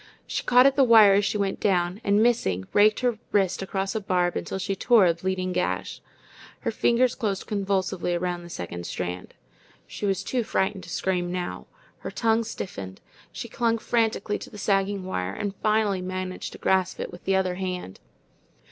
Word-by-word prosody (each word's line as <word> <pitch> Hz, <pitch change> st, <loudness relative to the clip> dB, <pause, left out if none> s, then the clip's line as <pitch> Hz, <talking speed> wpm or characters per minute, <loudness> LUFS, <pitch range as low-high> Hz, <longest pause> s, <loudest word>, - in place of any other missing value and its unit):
She -, -, -3 dB
caught 250 Hz, +1 st, +5 dB
at 275 Hz, 0 st, +5 dB
the 275 Hz, -, +5 dB
wire 220 Hz, -5 st, +7 dB
as 200 Hz, +1 st, +3 dB
she 210 Hz, -, 0 dB
went 200 Hz, -1 st, -1 dB
down, 180 Hz, 0 st, +1 dB
and 205 Hz, +2 st, +3 dB
missing, 95 Hz, -, +1 dB
raked 210 Hz, +2 st, +4 dB
her 245 Hz, -4 st, 0 dB
wrist 195 Hz, -3 st, +1 dB
across 195 Hz, 0 st, -2 dB
a 220 Hz, -, -2 dB
barb 180 Hz, -2 st, +1 dB
until -, -, -3 dB
she 195 Hz, +1 st, -2 dB
tore 220 Hz, +1 st, +5 dB
a 170 Hz, -, +4 dB
bleeding 185 Hz, +1 st, -2 dB
gash. -, -, -2 dB, 0.6 s
Her -, -, -1 dB
fingers 245 Hz, +1 st, +2 dB
closed 205 Hz, -6 st, -2 dB
convulsively 190 Hz, -3 st, -1 dB
around 175 Hz, 0 st, -2 dB
the 175 Hz, -, -11 dB
second 85 Hz, -, -6 dB
strand. 90 Hz, 0 st, -5 dB, 0.5 s
She 205 Hz, -, -4 dB
was 195 Hz, -1 st, 0 dB
too 250 Hz, -2 st, -1 dB
frightened 190 Hz, -2 st, -1 dB
to -, -, -12 dB
scream 175 Hz, 0 st, -1 dB
now. 180 Hz, -1 st, -4 dB, 0.3 s
Her -, -, -6 dB
tongue 225 Hz, 0 st, +1 dB
stiffened. 100 Hz, -, -7 dB, 0.3 s
She -, -, -6 dB
clung 230 Hz, -1 st, 0 dB
frantically 220 Hz, -3 st, 0 dB
to -, -, -9 dB
the 210 Hz, -, -11 dB
sagging 195 Hz, -1 st, 0 dB
wire, 95 Hz, -, -3 dB
and 205 Hz, -1 st, -3 dB
finally 215 Hz, -3 st, +1 dB
managed 185 Hz, 0 st, -5 dB
to -, -, -9 dB
grasp 190 Hz, -1 st, +1 dB
it -, -, -4 dB
with 175 Hz, -, -12 dB
the 195 Hz, -, +2 dB
other 190 Hz, -1 st, +1 dB
hand. 180 Hz, -, -5 dB
195 Hz, 185 wpm, -25 LUFS, 180-215 Hz, 0.6 s, wire